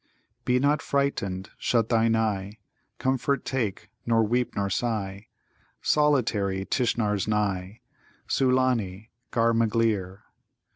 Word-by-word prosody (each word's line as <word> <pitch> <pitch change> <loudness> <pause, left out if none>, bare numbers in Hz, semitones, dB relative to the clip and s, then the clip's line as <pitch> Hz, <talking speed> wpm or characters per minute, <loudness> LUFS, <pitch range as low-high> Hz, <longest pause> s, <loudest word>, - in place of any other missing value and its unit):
"'Be 125 0 +3
not 145 +3 +2
frightened, 100 -9 -1
shut 115 -2 +1
thine 115 -1 +3
eye; 105 -2 -1 0.4
Comfort 135 +1 0
take, 110 -5 -3
nor 115 -1 +3
weep, 120 +3 0
nor 100 -1 0
sigh; 100 -2 -2 0.6
Solitary 110 -10 +2
Tishnar's 110 -6 0
nigh!' 105 -1 -1 0.5
Sulâni, 125 -6 +1 0.2
ghar 115 0 +2
magleer. 110 -4 0
110 Hz, 100 wpm, -26 LUFS, 100-125 Hz, 0.6 s, Be